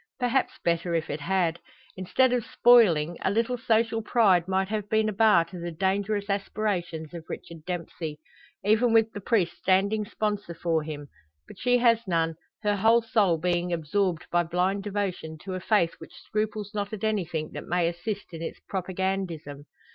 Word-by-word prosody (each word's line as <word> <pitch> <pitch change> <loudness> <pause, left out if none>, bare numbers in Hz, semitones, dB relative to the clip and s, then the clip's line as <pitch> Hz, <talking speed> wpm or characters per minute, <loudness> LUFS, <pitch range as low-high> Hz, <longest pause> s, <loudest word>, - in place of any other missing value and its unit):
Perhaps 250 +1 0
better 170 0 +1
if 160 -1 -1
it 145 - -3
had. 170 0 0 0.4
Instead 245 +7 +2
of 245 -2 +1
spoiling, 175 -12 +4
a - - +1
little 230 +5 +1
social 225 0 +1
pride 200 -6 +3
might 190 0 +1
have 210 -2 -3
been 220 0 +2
a 215 - -1
bar 200 -5 +5
to 175 +1 -10
the 170 0 -4
dangerous 200 +4 -1
aspirations 195 -6 -2
of 165 -2 -8
Richard 165 -2 -8
Dempsey 165 -3 -5 0.5
even 225 +3 +3
with 225 0 +4
the 205 - -6
priest 185 -6 +1
standing 200 +3 +2
sponsor 205 -5 -3
for 165 -1 0
him. 150 -2 -7 0.4
But - - -13
she 245 0 +3
has 235 -2 +3
none, 165 -2 +1 0.3
her 205 -1 +1
whole 225 +3 +4
soul 215 -8 +2
being 175 +1 0
absorbed 170 +2 0
by 175 - +4
blind 180 +4 0
devotion 190 -6 -3
to 190 - -5
a 185 - -3
faith 180 -3 +2
which - - -12
scruples 215 -1 -3
not 205 0 -3
at 215 - -6
anything 175 -8 -1
that - - -7
may 175 -1 +1
assist 180 +3 -4
in 165 - -7
its 165 - -5
propagandism. 185 -6 -3
190 Hz, 175 wpm, -27 LUFS, 170-215 Hz, 0.5 s, bar